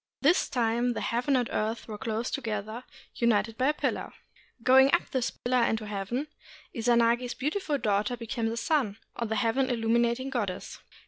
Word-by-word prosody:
At - - -22
this 320 +6 +4
time 240 0 +1
the - - -4
heaven 245 +4 +1
and 245 -2 +1
earth 220 +2 -2
were 210 -2 -7
close 225 +2 -2
together, 220 -1 -4 0.3
united 225 -2 +1
by 255 +3 +1
a 295 - +3
pillar. - - -2 0.5
Going 265 +2 +6
up 345 - -3
this 260 -3 0
pillar 250 0 0
into 225 -1 0
heaven, 210 +7 -3 0.5
Izanagi's 235 +1 +2
beautiful 300 +2 -1
daughter 210 0 0
became 230 0 -2
the 230 - -4
sun, 240 -7 0 0.2
or 235 - -2
the 220 - -1
Heaven 250 +3 +1
illuminating 235 +2 +1
Goddess. 205 -8 -3
235 Hz, 170 wpm, -28 LUFS, 225-255 Hz, 0.5 s, Going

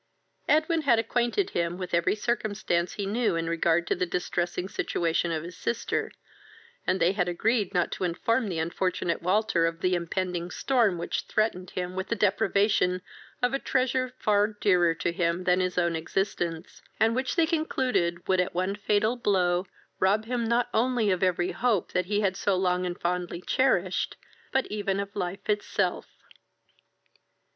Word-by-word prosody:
Edwin 315 +2 +3
had 260 -6 +4
acquainted 240 - 0
him 170 0 -1
with 185 -2 -6
every 170 +4 +2
circumstance 210 -6 -1
he 205 - -3
knew 215 -1 +1
in 165 0 -1
regard 170 0 +2
to - - +1
the 180 0 -1
distressing 175 +1 -2
situation 170 -2 -1
of 160 -1 -2
his 175 +1 -8
sister, 225 +5 -2 0.8
and 185 - +2
they 175 - +4
had 190 -3 0
agreed 210 +3 +1
not 175 -1 +1
to - - -4
inform 210 +6 0
the 175 - -3
unfortunate 170 +1 -1
Walter 185 -1 +2
of 165 0 -5
the 185 0 +2
impending 175 0 -2
storm 230 -5 +1
which 170 - -3
threatened 185 -4 0
him 180 0 -4
with 190 +1 -3
the - - 0
deprivation 200 -2 +2 0.4
of 245 +1 +2
a 275 - +1
treasure 255 -1 0
far 205 -2 +3
dearer 180 -6 +2
to 170 +1 -1
him 170 +1 0
than 180 0 +3
his 185 -1 -1
own 170 -1 +2
existence, 170 -1 -3 0.2
and 225 +1 +4
which 260 +1 -1
they 335 -2 +4
concluded 255 - 0
would 185 -1 +3
at 180 - 0
one 185 +2 0
fatal 210 +3 +1
blow 185 -5 +1 0.3
rob 205 +3 +2
him 240 0 -1
not 235 +2 +2
only 235 -2 +2
of 185 - 0
every 180 -1 +1
hope 230 -7 0
that 180 0 0
he 205 +1 +1
had 190 -2 +1
so 200 0 +1
long 180 0 +1
and 175 - -5
fondly 175 0 -2
cherished, 185 -4 +1 0.3
but 265 0 +1
even 200 -2 -1
of 200 0 -5
life 185 -1 -4
itself. 205 -3 0
190 Hz, 170 wpm, -27 LUFS, 175-220 Hz, 0.8 s, had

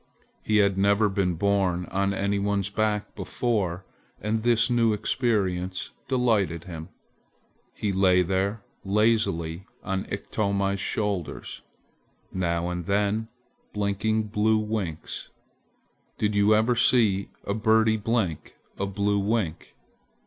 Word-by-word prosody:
He 105 - +1
had 100 -2 +3
never 100 +2 +3
been 95 -3 0
borne 95 -1 +1
on 100 +1 +1
any 100 +1 0
one's 100 -1 -1
back 105 0 -1
before 95 -3 -2 0.3
and 110 +1 -1
the 120 0 +3
new 115 -2 +3
experience 95 -6 -1 0.2
delighted 110 - +1
him. 80 -3 -8 0.9
He 100 -2 -1
lay 95 -1 +4
there 95 +4 -1 0.2
lazily 95 -5 +1 0.2
on 95 -1 -2
Iktomi's 100 -1 -1
shoulders, 100 -3 -3 0.7
now 85 -2 0
and 90 -1 -5
then 105 +2 +1 0.5
blinking 105 +2 0
blue 110 +1 +2
winks. 105 -7 -4 0.9
Did 105 0 0
you 100 0 +3
never 110 +3 +4
see 115 -5 +3
a 100 - -2
birdie 110 0 +3
blink 105 -7 -2 0.2
a 100 - 0
blue 100 +1 0
wink? 100 -5 -2
100 Hz, 115 wpm, -26 LUFS, 95-110 Hz, 0.9 s, lay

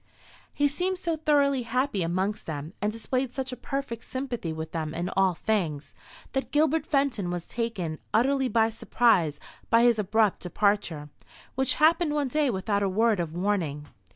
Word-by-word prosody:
He 290 - +2
seemed 365 +6 -1
so 340 -2 -1
thoroughly 285 -4 +2
happy 245 -2 -1
amongst 185 +5 -1
them, 155 +1 -5
and 210 +1 +1
displayed 255 +3 -2
such 265 -1 -3
a - - -4
perfect 245 -2 -4
sympathy 250 -10 -4
with 160 0 -5
them 160 -1 -3
in 175 +1 -2
all 190 -2 +2
things, 160 -10 -2 0.4
that 270 0 -2
Gilbert 310 +1 +2
Fenton 275 - +1
was 175 -1 -3
taken 195 -10 -3
utterly 265 +3 +2
by 225 -2 +2
surprise 195 -9 +2 0.3
by 230 +1 +5
his 240 -2 +4
abrupt 210 0 +2
departure, 180 -5 0 0.4
which 265 0 +1
happened 315 0 +3
one 290 -3 0
day 300 +1 +1
without 200 -1 0
a 200 - +1
word 220 +1 +2
of 165 -2 -3
warning. 170 -7 -1
225 Hz, 165 wpm, -27 LUFS, 180-270 Hz, 0.4 s, by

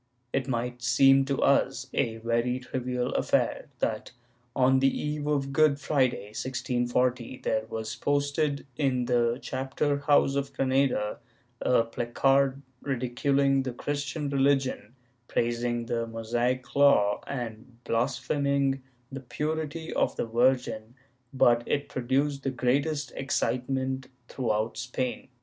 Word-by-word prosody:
It 135 0 0
might 125 -1 -2
seem 135 +2 +5
to 135 0 -1
us 135 -2 +2
a 115 -4 0
very 115 +2 0
trivial 125 -1 -3
affair - - 0
that, 110 +3 -2 0.4
on 130 0 +4
the 135 - +4
eve 150 +1 -3
of 140 -2 0
Good 150 -1 +4
Friday, 130 -9 0
1640, 125 0 -1
there 110 0 0
was 110 -1 -4
posted, 145 +2 0
in 130 -4 +1
the 120 -1 +2
chapter 135 +2 -1
house 140 -1 +3
of 140 0 -2
Granada, 130 -6 +1 0.4
a 125 - +3
placard 135 +4 +1 0.2
ridiculing 135 +1 +1
the 130 -2 -4
Christian 145 +3 -3
religion, 135 -2 +1 0.3
praising 120 0 -1
the 115 0 -2
Mosaic 120 +3 -2
Law, 140 -8 +4
and 120 -2 -6
blaspheming 135 +3 0 0.3
the 135 - -5
purity 155 +4 -3
of - - +1
the - - -1
Virgin, 120 -1 +1 0.4
but 120 -3 +4
it 140 - -1
produced 135 +3 0
the 135 - -1
greatest 140 +3 0
excitement 130 0 -1 0.2
throughout 110 -3 -1
Spain. 125 0 -3
130 Hz, 120 wpm, -28 LUFS, 120-140 Hz, 0.4 s, seem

